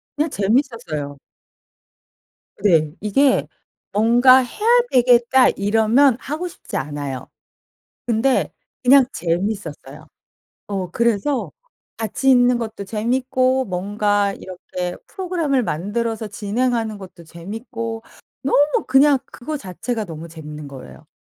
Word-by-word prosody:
그냥 300 +2 0
재밌었어요. 195 - -1 1.4
네. 160 -7 +3
이게 260 +7 +2 0.4
뭔가 240 +5 +6
'해야 420 - -5 0.2
되겠다.' 245 +1 +5
이러면 225 +6 +3
하고 310 +7 -4
싶지 345 - -7
않아요. 140 -2 -5 0.8
근데 245 +3 +1 0.3
그냥 265 +1 +6
재밌었어요. 170 -5 -4 0.6
어 190 -3 -4
그래서 235 +5 0 0.5
같이 225 +4 -1
있는 245 -1 +5
것도 220 -3 -5
재밌고 255 +5 0
뭔가 205 +2 0
이렇게 180 -1 -6
프로그램을 335 -8 -1
만들어서 220 +6 -2
진행하는 220 +2 -1
것도 185 -3 -12
재밌고 225 +7 -7 0.4
너무 290 +2 +2
그냥 275 +1 +5
그거 300 +6 -6
자체가 215 - -4
너무 165 -2 -8
재밌는 150 -2 -9
거예요. 135 -2 -12
220 Hz, 250 characters per minute, -20 LUFS, 185-255 Hz, 1.4 s, 뭔가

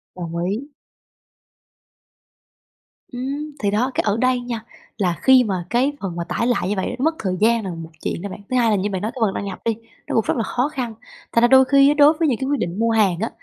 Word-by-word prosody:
Đồng 170 -2 -6
ý. 220 +10 -3 2.4
Ừm, 275 +5 -4
thì 200 -2 0
đó! 240 +6 +1
Cái - - +1
ở 205 +1 +2
đây 255 +1 +2
nha, 240 -2 -5 0.3
là 180 -4 0
khi 260 -1 +6
mà 190 -6 -3
cái 250 +4 +2
phần 185 -4 -4
mà 170 - -3
tải 230 +7 -2
lại 240 -7 0
như 205 - 0
vậy 190 +5 -2
nó - - -1
mất 320 +1 +2
thời 185 -3 -2
gian 230 +1 +3
là - - -3
một 165 -1 -8
chuyện - - -3
đó 200 - -5
bạn. 185 - -8
Thứ 255 - +1
hai 235 -2 +3
là 215 - +3
như 200 +1 -1
bạn 190 -2 -3
nói 215 +2 -2
cái 260 - -9
phần 210 -3 +2
đăng 200 - -4
nhập 190 -2 -6
đi, 230 -1 +1 0.3
nó - - -2
cũng 225 - +2
rất - - +1
là 230 - 0
khó 250 +5 -1
khăn, 250 -6 -4 0.4
thành 230 - +3
ra 240 - +6
đôi 265 +1 +6
khi 275 +1 +5
á, - - +4
đối 295 +1 +6
với 325 - +3
những 245 -6 +1
cái 265 - -2
quyết 290 -2 0
định 175 0 -3
mua 230 0 +2
hàng 205 -6 +2
á, 225 - -1
230 Hz, 265 wpm, -21 LUFS, 195-255 Hz, 2.4 s, khi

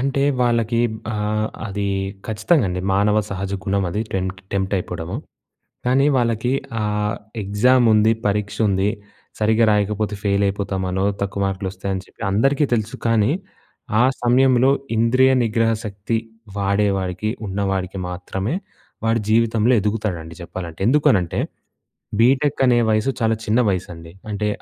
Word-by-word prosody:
అంటే 135 +1 0 0.2
వాళ్ళకి 115 -1 +1 0.3
ఆహ్, 105 +1 0 0.2
అది 100 0 -2 0.4
ఖచ్చితంగా 110 +6 +2
అండి. 90 0 -2
మానవ 105 +2 +3
సహజ 95 0 -3
గుణమది. 100 0 0
టెం 95 -1 0 0.3
టెంప్టైయిపోవడము. 95 -1 -2 0.7
కానీ 135 +3 +3
వాళ్ళకి 115 0 0 0.3
ఆహ్, 105 0 -1 0.3
ఎగ్జాముంది, 110 +1 +4 0.2
పరీక్షుంది. 100 -1 +1 0.5
సరిగ్గా 110 +1 +3
రాయకపోతే 105 0 0
ఫెయిలైపోతామనో, 100 -1 0 0.2
తక్కువ 100 0 -2
మార్కులొస్తాయని 95 0 -3
చెప్పి - - -20
అందరికీ 135 +8 +3
తెలుసు. 110 -1 -1
కానీ, 115 +2 +3 0.7
ఆ - - +5 0.2
సమయంలో 130 +1 +4 0.3
ఇంద్రియ 130 +3 +4
నిగ్రహ 115 0 +2
శక్తి 105 +2 -2 0.4
వాడే 100 +1 +2
వాడికి, 95 +3 -2 0.2
ఉన్నవాడికి 95 -1 -2
మాత్రమే 95 - -3 0.5
వాడు 115 +1 +2
జీవితంలో 115 +1 +3
ఎదుగుతాడండి 95 -6 -3
చెప్పాలంటే. 85 -1 -7
ఎందుకనంటే, 110 - +3 0.8
బీటెకనే 130 0 +3
వయస్సు 110 +5 +2
చాలా 115 0 +2
చిన్న 110 +4 +2
వయసండి. 85 -3 -5 0.2
అంటే, 105 +1 -1
105 Hz, 110 wpm, -21 LUFS, 95-115 Hz, 0.8 s, ఆ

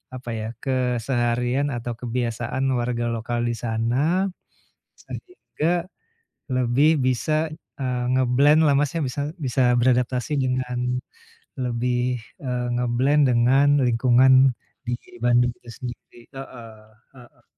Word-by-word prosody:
apa 125 -1 -8
ya, 110 0 -4 0.2
keseharian 125 0 0
atau 120 0 -4
kebiasaan 120 +1 -3 0.2
warga 120 0 -1
lokal 115 +1 -3
di - - 0
sana 125 - 0 0.7
sehingga 175 - -4 0.7
lebih 130 +4 +3 0.2
bisa, 130 +4 0 0.5
eee, 125 -1 -1
nge-blend 130 +5 +4
lah, 145 - +4
Mas, 145 -1 +1
ya. - - -1
Bisa 130 +3 -3 0.2
bisa 130 +1 0 0.2
beradaptasi 125 +2 +1
dengan 125 -1 -1 0.8
lebih, 125 0 -1 0.2
eee, 125 -3 -2
nge-blend 125 +5 +2
dengan 125 +4 +4 0.2
lingkungan 125 +2 +4 0.5
di 120 0 -1 0.3
Bandung 120 0 +3
itu 120 - -20
sendiri 120 -1 -9
heeh, 115 -5 -10 0.4
heeh. 120 -1 -18
125 Hz, 110 wpm, -23 LUFS, 120-130 Hz, 0.8 s, nge-blend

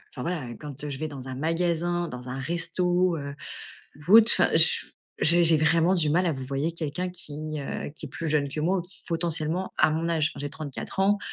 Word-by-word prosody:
enfin 125 - -6
voilà, 160 -3 -3
quand, 145 -1 -9
heu, 150 - -4
je 135 - -5
vais 155 +3 -3
dans 135 -3 -8
un 130 - -5
magasin, 170 +3 0
dans 125 -1 -8
un 130 +1 -4
resto, 175 +3 0
heu, 140 0 -6 0.7
ou - - +3
autre 230 0 +7
enfin - - +4
je - - +5 0.3
j'ai 170 +2 +4
j'ai 160 -1 +6
vraiment 165 +4 +3
du 155 -4 +2
mal 180 +3 +2
à 165 - +1
vouvoyer 135 +4 -3
quelqu'un 165 +2 -3
qui, 155 -3 -6
heu, 140 - -5
qui - - -6
est - - -10
plus 165 - -4
jeune 145 -2 +1
que 150 - -4
moi, 180 +5 +1
ou - - -3
qui 180 +2 -8
potentiellement 165 +1 0
à - - +5
mon 160 +2 -1
âge. 160 -2 +2
Enfin 140 - -10
j'ai 145 0 -4
34 155 +5 -6
ans, 205 +2 +3
160 Hz, 230 wpm, -26 LUFS, 145-175 Hz, 0.7 s, autre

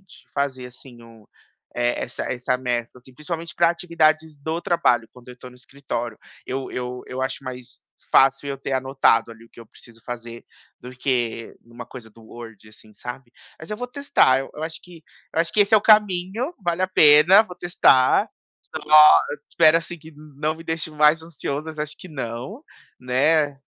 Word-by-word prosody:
de 170 - -20
fazer, 130 -3 -2
assim, 125 0 -15
o 115 -2 -18 0.5
eh, 120 0 -1
essa 120 - -5
essa 125 0 -2
mescla, 120 -1 -3
assim, 125 +1 -19
principalmente 165 +3 -6
para 170 -1 +3
atividades 160 -3 0
do 160 +4 -4
trabalho, 120 -10 +1
quando 125 0 -17
eu 125 - -10
estou 125 +1 -13
no 125 - -17
escritório. 125 -3 -6 0.3
Eu 135 +1 -5
eu 125 0 -5
eu 130 +1 -5
acho 130 +1 -4
mais 125 -1 -10 0.2
fácil 135 +1 +3
eu 135 -1 -5
ter 135 +1 -5
anotado 130 -2 +1
ali 115 0 -14
o - - -21
que - - -16
eu 115 - -13
preciso 115 +1 -18
fazer 120 -1 -8 0.4
do 125 - -10
que 125 -3 -3
em 115 - -23
uma 120 +1 -9
coisa 115 -3 -12
do 115 +2 -19
Word, 115 -2 -12
assim, 110 0 -17
sabe. 125 +1 -9 0.3
Mas 160 - -11
eu 210 - -3
vou 245 - -5
testar, 280 - +2
eu 135 - -8
eu 150 - -7
acho 160 0 -7
que 175 -3 -15 0.3
eu - - -3
acho 165 0 -1
que 210 - +2
esse 205 +1 +4
é - - +8
o - - +3
caminho, 210 - +2
vale 175 -1 -1
a 185 - +1
pena, 160 +3 +6
vou 180 - -11
testar. 135 -7 +3 0.6
Lógico, 150 -1 +6
espero, 160 0 +4
assim, 170 +1 -7
que 160 +1 -14
não 150 -1 -16
não 155 +2 -1
me 165 - -12
deixe 160 -1 -4
mais 150 +1 +3
ansioso, 155 -2 -5
mas 155 -1 -9
acho 150 0 -4
que 185 - -12
não, 135 - -7 0.4
né. 145 +3 +1
140 Hz, 195 wpm, -22 LUFS, 125-165 Hz, 0.6 s, é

